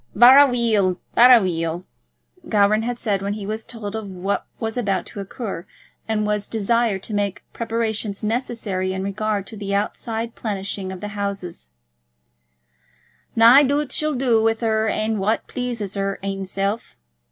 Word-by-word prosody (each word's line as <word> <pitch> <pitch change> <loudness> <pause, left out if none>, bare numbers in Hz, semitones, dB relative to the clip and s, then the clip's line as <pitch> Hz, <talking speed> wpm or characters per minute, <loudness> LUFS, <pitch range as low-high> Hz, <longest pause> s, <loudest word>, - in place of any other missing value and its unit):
"Varra 260 +6 +9
weel; 220 -7 +1 0.2
varra 245 0 +8
weel," 170 -3 -2 0.7
Gowran 210 0 +3
had 240 +1 -3
said 205 -5 -1
when 200 +1 -2
he 205 -1 -6
was 215 +2 -4
told 220 -3 -7
of 220 -2 -5
what 190 +2 -3
was 225 -1 -3
about 205 -6 -1
to - - -9
occur, 195 -3 -6 0.4
and 215 -1 0
was 210 -1 -1
desired 225 -2 0
to 215 - -6
make 205 -1 -1
preparations 225 -3 -2
necessary 215 -5 -2
in 190 0 -3
regard 205 0 -2
to 220 - -8
the 200 -1 -3
outside 225 +3 -2
plenishing 195 -2 -4
of 185 - -8
the 210 - -4
house; 200 - -5 1.7
"nae 235 +5 +8
doobt 285 0 +1
she'll 305 +1 0
do 245 -3 +2
with 225 +1 +1
her 220 -1 +1
ain 215 0 0
what 215 +4 0
pleases 235 -6 -4
her 195 -1 -2
ainself. 195 +2 -3
215 Hz, 150 wpm, -22 LUFS, 195-230 Hz, 1.7 s, Varra